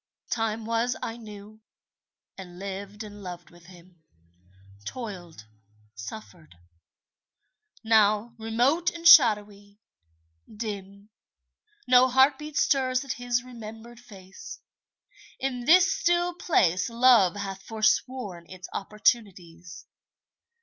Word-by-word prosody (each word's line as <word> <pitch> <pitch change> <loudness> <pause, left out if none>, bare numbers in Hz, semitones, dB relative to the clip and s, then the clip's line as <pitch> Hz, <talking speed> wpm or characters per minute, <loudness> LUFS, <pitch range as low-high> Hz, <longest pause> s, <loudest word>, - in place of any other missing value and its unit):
Time 225 -1 -2
was 230 +2 -1
I 225 - -4
knew, 215 -1 -12 0.7
and 180 -2 -11
lived 200 +2 -7
and 205 -1 -11
loved 175 -2 -9
with 175 0 -19
him; 175 -1 -18 0.8
Toiled, 175 - -8 0.5
suffered. 155 - -11 1.3
Now, 220 0 +2
remote 245 +10 +1
and 335 -1 -2
shadowy, 205 -8 +5 0.7
dim, 205 -1 -8 0.7
No 250 0 +5
heartbeat 275 +3 +2
stirs 260 -1 +1
at 270 - -3
his 245 0 -2
remembered 230 -1 -11
face. 205 - -12 0.8
In 250 -2 -3
this 365 +5 +5
still 350 0 0
place 185 - +1
Love 230 -6 +4
hath 195 -1 -6
forsworn 215 -4 -1
its 185 0 -10
opportunities. 195 -5 -2
215 Hz, 95 wpm, -26 LUFS, 195-250 Hz, 1.3 s, shadowy